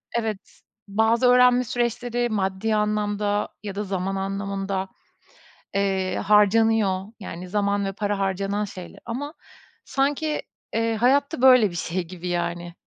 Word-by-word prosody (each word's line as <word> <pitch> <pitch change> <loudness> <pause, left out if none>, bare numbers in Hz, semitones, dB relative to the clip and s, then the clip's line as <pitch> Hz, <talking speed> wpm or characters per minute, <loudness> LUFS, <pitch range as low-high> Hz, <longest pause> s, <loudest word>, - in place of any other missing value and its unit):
Evet, 220 -4 -3 0.3
bazı 220 +4 +3
öğrenme 250 0 +6
süreçleri 240 0 -1
maddi 205 +1 0
anlamda 210 -1 0
ya 200 -2 -5
da 205 - -2
zaman 195 -1 -2
anlamında, 195 0 -3 0.9
eee, 190 -2 0
harcanıyor. 210 -2 +3 0.2
Yani, 180 -1 -7
zaman 200 0 0
ve 195 - -1
para 205 0 -2
harcanan 195 +2 -1
şeyler 185 -3 -10
ama 280 +6 -4 0.5
sanki, 290 +3 0 0.3
eee, 225 0 +1
hayatta, 280 +5 +2
böyle, 255 -6 +7
bir - - -9
şey 175 +1 -2
gibi 180 0 -7
yani. 175 0 -2
205 Hz, 125 wpm, -24 LUFS, 195-230 Hz, 0.9 s, böyle